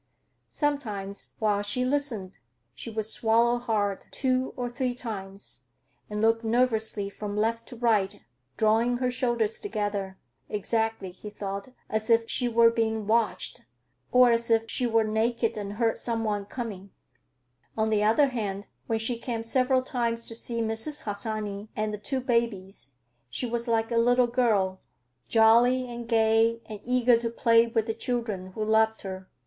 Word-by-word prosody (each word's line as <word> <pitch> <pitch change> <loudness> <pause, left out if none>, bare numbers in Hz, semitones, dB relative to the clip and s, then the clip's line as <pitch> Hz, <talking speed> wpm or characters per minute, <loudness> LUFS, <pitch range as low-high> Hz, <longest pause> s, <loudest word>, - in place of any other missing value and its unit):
Sometimes, 215 -10 -3
while 210 -2 +1
she 205 +5 0
listened, 255 -9 -1 0.3
she 130 - -8
would 220 -1 -2
swallow 230 +2 +2
hard, 205 -4 -1
two 255 -1 0
or 245 -1 -2
three 245 +1 -2
times, 195 - -5 0.4
and 210 +1 -2
look 225 +1 +3
nervously 220 -3 +1
from 205 +1 -6
left 230 +2 0
to 250 - -9
right, 220 -5 +1 0.4
drawing 225 +3 +3
her 250 0 0
shoulders 240 -3 0
together. 205 - -3 0.3
"Exactly," 220 -1 -1
he 200 +4 -9
thought, 200 0 -5 0.2
"as 220 +1 -2
if 230 0 +4
she 245 - +2
were 230 0 +5
being 225 -2 -1
watched, 225 +1 0 0.5
or 250 -1 +6
as 235 0 0
if 225 0 +3
she 250 - +1
were 225 -1 +3
naked 225 +2 0
and 205 -1 -5
heard 225 +1 +1
some 230 -1 -1
one 205 -2 -1
coming." 205 -4 -6 0.9
On 220 0 +1
the 210 -1 +2
other 250 +7 +4
hand, 205 -5 -3 0.2
when 225 - +1
she 230 +1 -1
came 235 -2 -3
several 255 +2 +2
times 235 -3 -2
to - - -5
see 230 0 -2
Mrs. 225 +7 -2
Harsanyi 210 -1 -3
and 215 0 -1
the 210 - -5
two 260 +6 -3
babies, 230 - -1 0.4
she 125 - -3
was 235 0 -2
like 225 0 +1
a 235 - +1
little 245 +2 +4
girl, 215 -6 +1 0.5
jolly 240 +3 +5
and 235 -1 -7
gay 225 0 +3
and 215 -2 -8
eager 250 -1 +4
to 230 0 -2
play 230 0 +4
with 225 -1 0
the 225 - -2
children, 220 -6 -3
who 215 +1 -2
loved 220 0 +2
her. 190 -1 -7
225 Hz, 160 wpm, -27 LUFS, 210-240 Hz, 0.9 s, or